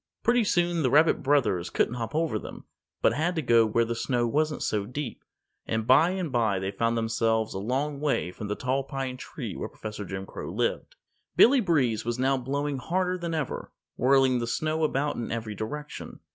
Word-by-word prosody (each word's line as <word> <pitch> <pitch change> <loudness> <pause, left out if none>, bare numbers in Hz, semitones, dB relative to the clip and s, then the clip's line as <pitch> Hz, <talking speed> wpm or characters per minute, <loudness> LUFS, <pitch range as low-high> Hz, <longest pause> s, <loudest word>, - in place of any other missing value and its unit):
Pretty 240 0 +4
soon 175 -3 +1
the 130 - +2
rabbit 155 +5 +4
brothers 130 -11 +2
couldn't - - +1
hop 120 +3 -4
over 155 -9 0
them, - - -10 0.4
but - - +5
had 175 +4 0
to 160 - 0
go 115 -2 +5
where 115 +2 +2
the 115 - -2
snow 120 +1 0
wasn't 150 +6 0
so 105 -2 -1
deep, 125 -1 -5 0.4
and 110 -1 -1
by 145 +8 +6
and 185 -5 -3
by 115 -5 +2
they 95 +1 -2
found 115 +3 0
themselves 115 -1 0
a 95 - -3
long 135 +7 -2
way 145 -11 0
from 105 +3 -7
the 105 - -2
Tall 130 +3 -1
Pine 135 -2 -4
Tree 130 - -7
where - - -5
Professor 105 -1 -7
Jim 95 0 -5
Crow - - -7
lived. - - -2 0.4
Billy 265 +3 +7
Breeze 140 - +1
was 120 +1 -2
now 135 +2 +2
blowing 140 +2 -2
harder 180 +5 0
than 170 -2 -3
ever, 150 -5 -4 0.2
whirling 130 -1 +4
the 120 - -2
snow 155 +5 -1
about 145 -1 0
in 120 - -4
every 110 -2 -3
direction. 145 +9 -6
130 Hz, 200 wpm, -27 LUFS, 115-150 Hz, 0.4 s, Billy